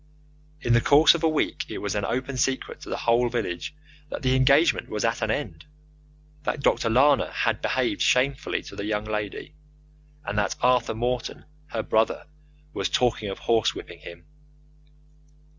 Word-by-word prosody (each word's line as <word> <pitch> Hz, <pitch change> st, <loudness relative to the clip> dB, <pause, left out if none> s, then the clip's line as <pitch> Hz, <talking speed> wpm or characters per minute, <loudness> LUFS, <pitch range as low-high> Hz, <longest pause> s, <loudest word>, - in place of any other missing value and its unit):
In 120 Hz, -, +1 dB
the 120 Hz, -, +5 dB
course 145 Hz, +5 st, +6 dB
of 170 Hz, -, -3 dB
a 165 Hz, -, +3 dB
week 155 Hz, -, -1 dB
it -, -, -5 dB
was -, -, -3 dB
an -, -, -2 dB
open 130 Hz, +2 st, -3 dB
secret 130 Hz, +1 st, -2 dB
to -, -, -10 dB
the -, -, -2 dB
whole 120 Hz, +1 st, +2 dB
village 115 Hz, -, -4 dB, 0.3 s
that -, -, -6 dB
the 130 Hz, 0 st, +2 dB
engagement 140 Hz, +5 st, +3 dB
was 105 Hz, +1 st, -2 dB
at 115 Hz, 0 st, -1 dB
an 110 Hz, -, -1 dB
end, 105 Hz, -, -3 dB, 0.8 s
that 150 Hz, -1 st, -3 dB
Dr. 115 Hz, -, +2 dB
Lana 135 Hz, +5 st, +3 dB
had -, -, -1 dB
behaved -, -, -1 dB
shamefully 130 Hz, +2 st, +1 dB
to -, -, -11 dB
the 100 Hz, -, -5 dB
young 105 Hz, 0 st, -2 dB
lady, 105 Hz, -2 st, -4 dB, 0.7 s
and 105 Hz, +1 st, -1 dB
that 100 Hz, -2 st, 0 dB
Arthur 125 Hz, -2 st, +2 dB
Morton, 120 Hz, +2 st, -3 dB, 0.2 s
her 110 Hz, -6 st, -3 dB
brother, 110 Hz, 0 st, 0 dB, 0.5 s
was -, -, -2 dB
talking 115 Hz, -4 st, 0 dB
of 95 Hz, -, -5 dB
horse 115 Hz, -2 st, +1 dB
whipping -, -, -9 dB
him. 85 Hz, 0 st, -12 dB
120 Hz, 170 wpm, -25 LUFS, 110-130 Hz, 0.8 s, course